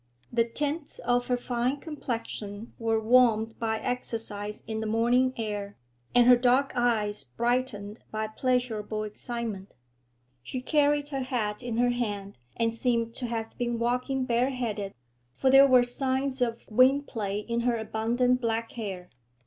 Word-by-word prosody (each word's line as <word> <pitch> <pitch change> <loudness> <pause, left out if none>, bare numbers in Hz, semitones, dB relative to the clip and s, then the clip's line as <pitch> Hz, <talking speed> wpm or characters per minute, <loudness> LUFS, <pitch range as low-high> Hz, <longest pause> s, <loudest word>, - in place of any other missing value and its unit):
The 230 -1 +3
tints 290 +5 -3
of 245 0 0
her 250 - +1
fine 245 +2 -1
complexion 230 -7 -5
were 225 -1 +1
warmed 225 -1 +3
by 220 -1 0
exercise 225 -4 -4
in 220 -1 -3
the 220 - -2
morning 240 +4 +3
air, 205 -2 -4 0.4
and 245 -1 +7
her 250 0 +9
dark 250 +3 +3
eyes 225 -4 0
brightened 230 - -2
by 220 0 -2
pleasurable 220 -2 -1
excitement; 215 -2 -5 0.7
she 255 - -5
carried 290 +1 +2
her 275 -2 -2
hat 235 -5 -1
in 240 -2 -3
her 245 0 +3
hand, 205 - -3 0.2
and 230 -1 +1
seemed 230 -1 0
to 245 - -4
have 225 -1 -4
been 240 -1 0
walking 250 +3 0
bare 245 +2 +2
headed, 220 -6 -3 0.4
for 265 - +2
there 270 +1 +8
were 255 -2 +6
signs 265 +2 -1
of 235 -1 0
wind 260 +5 +4
play 205 -6 -3
in 235 +2 -2
her 235 0 +1
abundant 235 +3 +1
black 230 -1 -1
hair. 190 -6 -6
235 Hz, 150 wpm, -28 LUFS, 220-250 Hz, 0.7 s, her